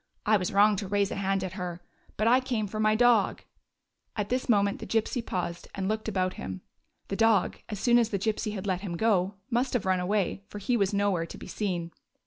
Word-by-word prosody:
I 215 - +4
was 185 -3 0
wrong 205 +1 +5
to 195 - -4
raise 200 0 +1
a - - -2
hand 195 0 0
to 190 - -2
her. 180 -2 -5 0.4
But 215 - +1
I 250 +2 +6
came 245 -5 -2
for 215 +2 -5
my 215 0 +3
dog" 235 -3 +3 0.4
— - - -52
at 205 -1 -2
this 255 +1 -1
moment 200 -2 +3
the - - -7
Gypsy 225 +2 0
paused 175 -4 -4
and 190 -1 -2
looked 215 +1 -2
about 185 -3 0
him. 95 -1 -5 0.5
The 195 - -1
dog, 225 -3 +3
as 210 -3 -4
soon 240 +2 +4
as 230 -2 +2
the 200 - -1
Gypsy 215 +1 -1
had 190 - -5
let 185 -2 -1
him 175 -4 -4
go, 200 -2 +2 0.2
must 245 +3 +1
have 245 -6 0
run 185 -1 +2
away, 195 +1 0
for - - -9
he 225 +5 0
was 200 -4 +2
nowhere 200 -5 +1
to - - -9
be - - -10
seen. 175 -5 -3
205 Hz, 235 wpm, -28 LUFS, 185-220 Hz, 0.5 s, I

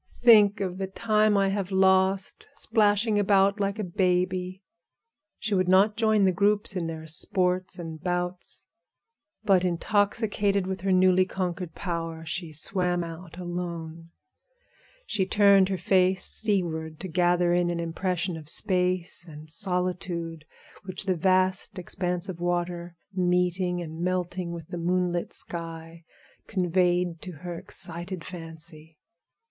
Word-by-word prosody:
Think 210 -3 +7
of 185 -1 -3
the 190 - -2
time 215 +1 +2
I 195 0 +3
have 195 -1 -2
lost 190 0 +2
splashing 210 -1 +2
about 200 0 +3
like 200 0 -1
a 215 - -2
baby!" 185 +1 0 0.7
She 215 - -2
would 185 -2 +2
not 195 +3 +4
join 220 -3 +3
the 190 - +4
groups 205 +2 +2
in 175 -3 -2
their 160 -1 -6
sports 180 +3 -1
and 165 -3 -7
bouts, 180 0 -3 0.8
but 190 -3 +4
intoxicated 200 +2 +1
with 190 -1 -4
her 195 0 0
newly 185 0 +5
conquered 180 -2 -4
power, 165 -3 -4
she 165 0 -4
swam 175 +3 0
out 165 0 -9
alone. 170 -2 -5 1.0
She 190 -3 -1
turned 200 -2 +5
her 190 - -1
face 185 +1 +2
seaward 165 -7 -1
to 190 - -4
gather 175 0 +2
in 175 0 +2
an 170 -1 -2
impression 175 +1 -2
of 155 -1 -7
space 180 -2 0
and 155 0 -10
solitude, 175 -3 0 0.4
which 190 +1 -5
the 190 -2 +1
vast 185 +2 +1
expanse 180 0 -3
of 180 -3 -6
water, 175 0 -2 0.2
meeting 180 -1 +1
and 160 0 -7
melting 180 -1 -2
with 165 -2 -8
the 175 - -5
moonlit 175 0 0
sky, 165 -1 -7 0.4
conveyed 180 -2 +1
to 180 - -7
her 175 -1 -4
excited 180 -2 -4
fancy. 160 -2 -8
180 Hz, 135 wpm, -27 LUFS, 170-190 Hz, 1.0 s, Think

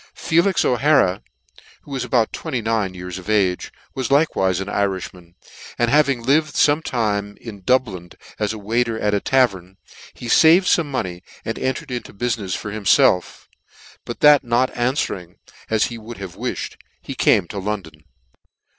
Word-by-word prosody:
FELIX 170 +3 +2
O'HARA, 125 -7 +3 0.6
who - - -14
was 135 -2 -2
about 115 -4 +1
29 110 -6 -2
years 90 0 -6
of 95 - -11
age, 95 -4 +1 0.2
was 130 -2 -3
likewife 115 - +2
an 95 - -4
Irifhman, 95 -4 -3 0.4
and 120 0 +1
having 140 -5 +3
lived 145 +4 +2
fome 150 +2 +3
time 105 -5 -2
in 105 -4 -10
Dublin 95 -6 0 0.3
as 105 -1 0
a 110 - -6
waiter 115 +2 -1
at 105 0 0
a 100 - +2
tavern, 95 -8 +1 0.4
he - - -10
faved 160 +9 +6
fome 170 -3 +2
money, 95 -11 -4 0.2
and 115 - -3
entered 130 +3 -3
into 125 -1 -5
bufinefs 105 -4 -2
for 105 - -6
himfelf; 100 -3 +2 0.6
bnt - - -6
that 150 -1 +7
not 120 +1 +1
anfwering 120 - -2 0.3
as 110 -1 +2
he 120 -1 -6
could 115 +2 -10
have 95 -3 -8
wifhed, - - -4 0.2
he - - -7
came 85 - +3
to 100 - -6
London. 95 -7 -5
110 Hz, 155 wpm, -21 LUFS, 95-130 Hz, 0.6 s, that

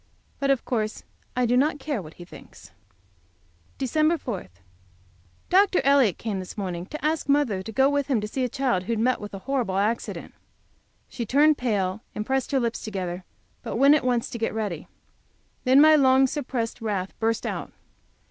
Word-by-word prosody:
But, 275 - 0
of 275 -3 +1
course, 215 -3 -2 0.3
I 250 0 +2
do 240 +1 +2
not 290 +4 +2
care 280 -5 -3
what 160 -2 -12
he 175 - -11
thinks. - - -14 1.1
Dec. 310 +5 +1
4. 205 - -5 1.0
Dr. 385 0 +4
Elliott 275 -8 +4
came 210 -4 -3
this 185 +3 -8
morning 180 -3 -4
to 305 +4 -6
ask 310 -2 -1
mother 280 -10 +2
to 220 - -7
go 265 +4 +3
with 285 -1 0
him 265 -6 +1
to 210 - -4
see 260 +4 -2
a 250 - 0
child 245 -8 0
who 230 - -1
had 225 - -2
met 250 +1 +1
with 205 -1 -7
a 190 - -10
horrible 250 -8 -1
accident. 215 +4 -2 0.7
She 240 - -5
turned 295 +4 +4
pale, 205 -5 -1
and 210 - -3
pressed 265 +2 -1
her 275 - +2
lips 235 -2 -2
together, 185 -4 -4 0.4
but - - -5
went 275 +3 +6
at 300 - +2
once 245 -2 0
to 235 - -5
get 225 -1 -2
ready. 205 -8 -3 0.8
Then 260 +2 +6
my 310 +1 +8
long 265 -2 +5
suppressed 250 -4 -3
wrath 200 -4 -2
burst 225 0 0
out. - - -4
245 Hz, 185 wpm, -25 LUFS, 210-275 Hz, 1.1 s, my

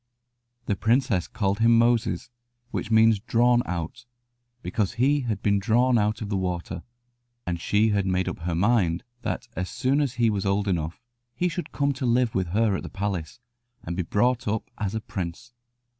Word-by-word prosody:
The 100 - 0
princess 115 -2 +1
called 100 -1 -1
him 115 0 +5
Moses, 120 0 +1 0.4
which - - -3
means 110 -1 +5
"drawn 120 +2 +3
out," 90 +8 -5 0.6
because 105 -3 -1
he 135 +5 +2
had 105 -4 -2
been 100 -1 +3
drawn 120 +3 +3
out 105 +1 0
of 105 - -6
the 100 - 0
water, 90 -1 -3 0.6
and 85 -1 -3
she 105 +3 +2
had 100 -2 +1
made 95 0 0
up - - -4
her 85 0 -2
mind 90 -3 +2 0.2
that - - -3
as 90 +1 -3
soon 130 +4 +1
as 140 -4 0
he 115 -2 +3
was 100 -2 -1
old 100 +1 0
enough 85 -3 -1 0.4
he 180 +8 +1
should 175 0 -4
come 140 0 +1
to 130 -1 -3
live 120 -1 +2
with 95 -2 0
her 105 +3 +2
at - - -3
the - - -7
palace, 95 -1 -4 0.4
and 85 - -4
be 90 - 0
brought 120 +8 +1
up 110 +1 -2
as 105 0 -2
a 110 - -2
prince. 95 +4 -6
105 Hz, 190 wpm, -25 LUFS, 95-120 Hz, 0.6 s, him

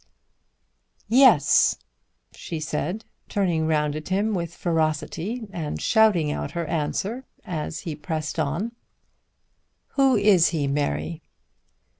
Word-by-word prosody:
"Yes," 230 - +5 0.6
she 165 - -6
said 155 +7 -3 0.2
turning 175 -6 0
round 150 -2 +1
at 155 +2 -6
him 205 +3 +1
with 170 -3 -3
ferocity 165 +7 -1
and 160 -4 -4
shouting 205 -9 +3
out - - -4
her 170 - -1
answer 190 - -2 0.2
as 160 -2 -4
she 165 -5 -5
pressed 155 +1 -4
on. 160 +10 -1 1.2
"Who 270 -2 +3
is 200 -5 +5
he, 155 -4 -1
Mary?" 145 +3 -2
165 Hz, 110 wpm, -24 LUFS, 155-205 Hz, 1.2 s, Yes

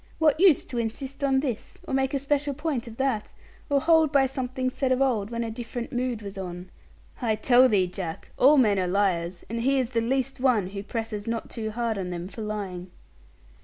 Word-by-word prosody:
What 310 -1 +3
use 360 -5 +5
to 240 - -4
insist 265 +5 -4
on 270 -1 +3
this, 250 -7 -4
or - - -4
make 265 +1 +1
a - - +3
special 280 +1 0
point 295 -5 -2
of 230 -1 -10
that, 265 -6 -1 0.4
or 285 -1 +3
hold 320 0 +4
by 275 -2 +4
something 255 -1 -2
said 265 0 -1
of 255 - +3
old, 235 -7 +1
when 235 0 -2
a 225 - -4
different 235 +3 -6
mood 245 -3 -2
was 200 -1 -7
on? 180 -1 -7 0.5
I 225 -3 +1
tell 250 +4 +5
thee, 200 -4 +3
Jack, 180 -2 -6
all 290 +4 +6
men 210 -7 +4
are 185 - 0
liars; 180 -2 0
and 230 +1 -3
he 270 +3 +2
is 255 -2 0
the 230 -2 +1
least 265 +3 -1
one 240 -8 +2
who 195 0 -5
presses 220 0 -4
not 230 0 -3
too 220 -2 -3
hard 225 -1 -2
on 180 -1 -3
them 175 0 -5
for 220 - -9
lying.' 195 -4 -4
235 Hz, 215 wpm, -26 LUFS, 205-270 Hz, 0.5 s, all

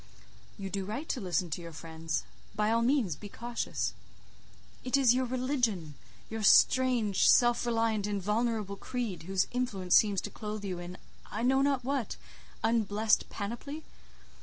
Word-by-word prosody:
"You 195 -2 -6
do 195 -1 -2
right 225 +11 -5
to 255 - -1
listen 180 -2 -1
to 165 - -3
your 170 -1 -9
friends. 160 0 -4 0.3
By 210 +1 +1
all 230 0 +3
means 235 - +2
be 205 +6 -10
cautious." 235 +3 -3 0.9
"It 255 +2 +2
is 260 -4 +5
your 255 +1 +1
religion—your 230 - -3
strange, 235 -2 +4
self 240 0 +4
reliant, 225 -3 +1
invulnerable 210 0 -1
creed, 210 -9 -4
whose 190 -1 +2
influence 205 -8 0
seems 205 -3 +4
to - - -6
clothe 210 -1 -6
you 185 -3 -3
in, 175 +1 -8 0.3
I 215 +3 -4
know 265 +2 +3
not 275 -2 +1
what, 265 -4 -2 0.5
unblessed 220 -1 +2
panoply. 240 +9 -5
215 Hz, 145 wpm, -30 LUFS, 195-245 Hz, 0.9 s, is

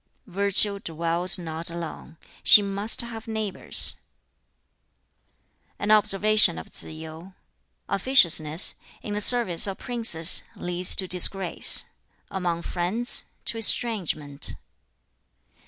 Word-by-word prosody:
"Virtue 200 +1 0
dwells 170 +1 +1
not 165 -1 -7
alone: 165 -1 -10 0.3
she 210 - +6
must 200 +2 -1
have 230 -2 -11
neighbors." 220 -3 -1 1.8
An 205 - -3
observation 215 - +3
of 80 - -11
Tsz - - -4
yu: 160 +4 -12 0.5
"Officiousness, 170 - +3 0.2
in 210 - -7
the 210 - -1
service 210 -7 +5
of 195 -1 -6
princes, 225 -9 0
leads 180 +1 0
to 190 - -4
disgrace: 180 0 +2 0.5
among 175 -3 -5
friends, 190 +8 0 0.2
to 225 - -3
estrangement." 175 -11 -1
185 Hz, 100 wpm, -23 LUFS, 165-215 Hz, 1.8 s, she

